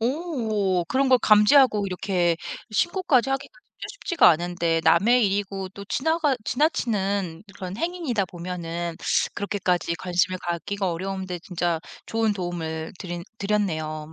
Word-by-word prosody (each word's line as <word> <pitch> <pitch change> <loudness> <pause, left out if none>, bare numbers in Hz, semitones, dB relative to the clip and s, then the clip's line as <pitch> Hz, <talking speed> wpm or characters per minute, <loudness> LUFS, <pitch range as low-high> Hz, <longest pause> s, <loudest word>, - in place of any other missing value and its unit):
오 225 - 0
그런 265 +7 +1
걸 255 -1 +6
감지하고 215 0 +5
이렇게 180 -2 0 0.4
신고까지 285 - +2
하기가 270 0 -3
진짜 - - -12
쉽지가 360 -8 +4
않은데 170 0 +1
남의 235 +9 +5
일이고 195 -1 -2
또 200 +1 -10
지나가 305 - +1
지나치는 200 - 0
그런 185 0 -6
행위이다 325 - -1
보면은 170 -1 -5 0.4
그렇게까지 185 -4 -1
관심을 180 +1 0
갖기가 180 +2 -2
어려운데 190 +1 -4
진짜 175 -4 -1 0.3
좋은 225 -1 +1
도움을 165 -4 -4
드린 175 -2 -5 0.2
드렸네요. 160 -7 -2
195 Hz, 325 characters per minute, -24 LUFS, 175-230 Hz, 0.4 s, 걸